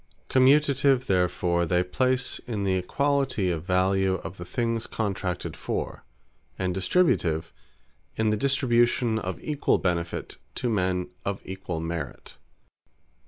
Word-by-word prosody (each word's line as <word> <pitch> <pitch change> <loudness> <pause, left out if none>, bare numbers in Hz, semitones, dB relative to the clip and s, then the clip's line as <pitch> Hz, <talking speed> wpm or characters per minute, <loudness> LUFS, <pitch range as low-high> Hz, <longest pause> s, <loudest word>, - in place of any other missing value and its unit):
Commutative 135 0 +4
therefore, 90 -2 +1
they 90 +2 +2
place 130 +7 0
in 110 -4 -2
the 95 -1 +1
equality 135 +1 +1
of 85 -2 -2
value 95 +1 +2
of 90 +3 -7
the 90 - -6
things 115 +3 -1
contracted 95 -4 -3
for; - - -4 0.5
And 95 -1 -1
Distributive, 90 - +1 0.6
in 110 -1 +1
the - - +2
distribution 120 -2 +2
of 95 -4 -4
equall 150 -2 +1
benefit, 85 -2 -2 0.2
to 125 -2 -1
men 90 -3 0
of 100 0 -2
equall 95 -3 -5
merit. 80 -4 -5
95 Hz, 120 wpm, -26 LUFS, 90-125 Hz, 0.6 s, Commutative